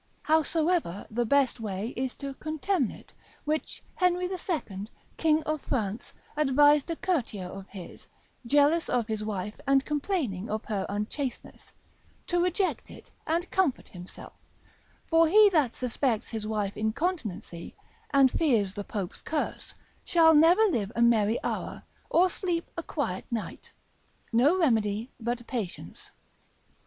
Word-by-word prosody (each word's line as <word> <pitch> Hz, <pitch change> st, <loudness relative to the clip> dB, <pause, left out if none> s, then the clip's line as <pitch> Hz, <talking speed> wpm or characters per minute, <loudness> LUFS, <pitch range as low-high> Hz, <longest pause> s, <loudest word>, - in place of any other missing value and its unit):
Howsoever 315 Hz, -, +1 dB
the 235 Hz, +1 st, 0 dB
best 275 Hz, -1 st, +2 dB
way 210 Hz, 0 st, -3 dB
is 255 Hz, +1 st, -3 dB
to 275 Hz, -1 st, -6 dB
contemn 310 Hz, -, -1 dB
it, -, -, -13 dB, 0.3 s
which 305 Hz, +1 st, -3 dB
Henry 360 Hz, -1 st, +1 dB
II. 315 Hz, -, -4 dB, 0.3 s
king 315 Hz, -1 st, +2 dB
of 310 Hz, -1 st, -2 dB
France 215 Hz, -3 st, -3 dB, 0.2 s
advised 290 Hz, +1 st, +4 dB
a 335 Hz, -, -1 dB
courtier 245 Hz, -, -2 dB
of 195 Hz, +2 st, -8 dB
his, 190 Hz, -4 st, -11 dB, 0.4 s
jealous 290 Hz, +5 st, +3 dB
of 240 Hz, -2 st, +1 dB
his 215 Hz, -1 st, -3 dB
wife, 210 Hz, -1 st, -4 dB
and 275 Hz, 0 st, +4 dB
complaining 285 Hz, -, -2 dB
of 215 Hz, +1 st, -3 dB
her 200 Hz, -3 st, -2 dB
unchasteness, 210 Hz, +6 st, -5 dB, 0.5 s
to 350 Hz, -1 st, +1 dB
reject 365 Hz, +2 st, 0 dB
it, -, -, -13 dB, 0.2 s
and 340 Hz, +3 st, -1 dB
comfort 370 Hz, -9 st, +1 dB
himself; 180 Hz, 0 st, -11 dB, 0.7 s
for 330 Hz, 0 st, +4 dB
he 420 Hz, +3 st, +7 dB
that 295 Hz, -9 st, +2 dB
suspects 245 Hz, -2 st, -1 dB
his 220 Hz, -2 st, -4 dB
wife's 210 Hz, -2 st, -2 dB
incontinency, 220 Hz, -, -3 dB, 0.4 s
and 275 Hz, -2 st, +5 dB
fears 225 Hz, -, +2 dB
the 205 Hz, -, -5 dB
Pope's 200 Hz, -3 st, -5 dB
curse, 310 Hz, -1 st, -3 dB, 0.3 s
shall 325 Hz, -2 st, +5 dB
never 330 Hz, +7 st, +6 dB
live 230 Hz, -, +1 dB
a 235 Hz, -, 0 dB
merry 225 Hz, -1 st, +3 dB
hour, -, -, -4 dB, 0.3 s
or 360 Hz, +2 st, +5 dB
sleep 350 Hz, -2 st, -2 dB
a 335 Hz, -, -3 dB
quiet 275 Hz, -, -3 dB
night: 230 Hz, -3 st, -5 dB, 0.6 s
no 275 Hz, +10 st, +4 dB
remedy 225 Hz, -, +1 dB
but 240 Hz, +1 st, -3 dB
patience. 225 Hz, -9 st, -6 dB
265 Hz, 135 wpm, -28 LUFS, 215-325 Hz, 0.7 s, he